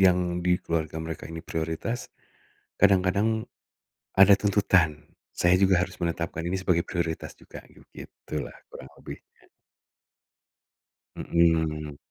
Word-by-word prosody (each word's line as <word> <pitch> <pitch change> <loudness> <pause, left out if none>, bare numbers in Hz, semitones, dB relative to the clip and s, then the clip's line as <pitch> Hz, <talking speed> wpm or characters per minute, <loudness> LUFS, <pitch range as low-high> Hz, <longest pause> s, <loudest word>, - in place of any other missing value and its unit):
yang 90 -2 +3
di 90 0 +2
keluarga 80 -2 -3
mereka 80 -1 -6
ini 80 +1 -8
prioritas, 80 +10 -3 0.7
kadang-kadang, 100 +4 +3 0.7
ada 95 +1 +8
tuntutan, 95 -7 +2 0.3
saya 90 +1 +4
juga 95 -2 +4
harus - - -7
menetapkan 85 -1 -3
ini 90 - -1
sebagai 90 -3 +1
prioritas 85 -2 -3
juga - - -12
begitulah 75 -4 -9 0.2
kurang 65 - -10
lebihnya. - - -9 2.0
Mhm. 80 -3 +1
85 Hz, 105 wpm, -26 LUFS, 80-95 Hz, 2.0 s, ada